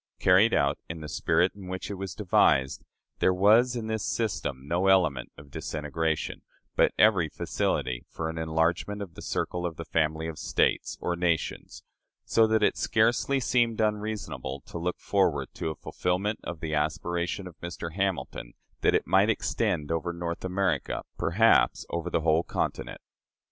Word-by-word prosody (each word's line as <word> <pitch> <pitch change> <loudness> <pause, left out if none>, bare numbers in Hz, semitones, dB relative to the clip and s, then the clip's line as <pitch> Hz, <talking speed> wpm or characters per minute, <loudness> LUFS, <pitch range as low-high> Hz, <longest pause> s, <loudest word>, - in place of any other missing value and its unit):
Carried 95 +5 +5
out 70 0 +2
in 80 -1 -6
the 75 - -6
spirit 90 +4 +1
in 100 -2 -11
which 95 +2 -5
it - - -2
was 95 -2 -6
devised, 70 -9 +2 0.4
there - - +4
was 110 +6 +5
in 115 -2 -3
this 110 -1 -2
system 70 - -2
no 90 +4 +1
element 85 -10 +3
of 70 -1 -14
disintegration, 80 +2 -2 0.3
but - - +4
every 95 -7 +4
facility 65 -4 -2
for 80 - -4
an 80 0 -4
enlargement 80 +6 0
of 90 -4 -11
the - - -10
circle 90 - -2
of 85 -2 -3
the - - -7
family 80 0 0
of 80 -1 -6
States - - 0
(or 90 - -1
nations), 85 -2 -2 0.4
so 110 -1 +4
that 110 -1 +2
it - - +3
scarcely 120 +5 +2
seemed 120 -3 +1
unreasonable 105 -10 -2
to 85 - -8
look 90 +2 -2
forward 80 -9 +1
to - - -3
a 80 - -4
fulfillment 95 +8 -2
of 85 -2 -6
the 80 -2 -3
aspiration 85 +5 -1
of 90 -3 -10
Mr. 85 -1 -6
Hamilton, 90 -10 -2 0.3
that - - +3
it - - +1
might - - +4
extend 75 +1 0
over 85 +1 -1
North 85 0 -4
America, 95 -5 -1 0.2
perhaps - - +3
over 85 +1 -2
the 85 - 0
whole 80 0 +3
continent. - - -3
85 Hz, 165 wpm, -28 LUFS, 80-100 Hz, 0.4 s, Carried